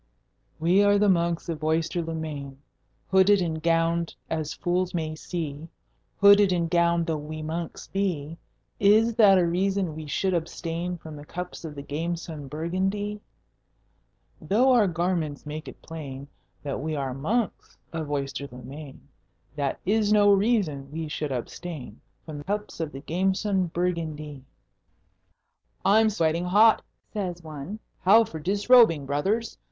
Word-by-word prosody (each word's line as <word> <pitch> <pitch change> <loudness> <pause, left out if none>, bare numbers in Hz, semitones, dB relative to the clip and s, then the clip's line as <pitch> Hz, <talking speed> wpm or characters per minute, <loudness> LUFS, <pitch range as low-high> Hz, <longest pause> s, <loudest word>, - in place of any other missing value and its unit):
We 175 +5 +4
are 205 0 +5
the 205 +1 +3
monks 170 -2 +1
of 160 -2 -4
Oyster 160 +2 0
le 165 0 -4
Main, 145 -4 -6 0.5
Hooded 190 +1 +5
and 160 -3 -2
gowned 165 0 +1 0.2
as 155 -2 -2
fools 180 +2 -1
may 160 -2 -2
see; 155 -2 -5 0.5
Hooded 200 -1 +7
and 170 -2 0
gowned 170 -1 +3
though 160 -2 -1
we 155 +1 -6
monks 165 +1 -5
be, 170 -5 -2 0.4
Is 215 +3 +5
that 200 -4 +7
a 180 - +3
reason 185 0 0
we 155 -1 -7
should 190 +6 0
abstain 170 +1 -3
From 155 -3 -10
cups 180 +3 -7
of 155 -3 -7
the 140 - -7
gamesome 160 0 -4
Burgundie? 195 +7 -2 1.2
Though 245 +7 +3
our 235 -5 +5
garments 170 -4 -1
make 150 +1 -6
it - - -11
plain 140 -4 -7 0.4
That 140 -3 -3
we 155 +1 -2
are 135 -3 -2
Monks 205 - -2 0.2
of 160 -3 -4
Oyster 140 -1 -3
le 125 0 -10
Main, 140 +2 -10 0.5
That 140 -2 -2
is 210 +2 +2
no 205 -1 +6
reason 195 - +1
we 160 0 -4
should 150 -1 -3
abstain 130 -1 -6 0.2
From 150 -2 -7
cups 210 0 -3
of 160 -2 -2
the 135 - -8
gamesome 190 +3 0
Burgundie. 160 -5 -3 1.4
"I'm 220 +3 +5
sweating 170 -3 0
hot," 215 +5 +5 0.3
says 180 -5 -4
one. 155 +5 -7 0.2
"How 210 +5 +6
for 165 -8 -7
disrobing, 200 - +4
brothers? 195 +12 -1
170 Hz, 145 wpm, -26 LUFS, 155-195 Hz, 1.4 s, Hooded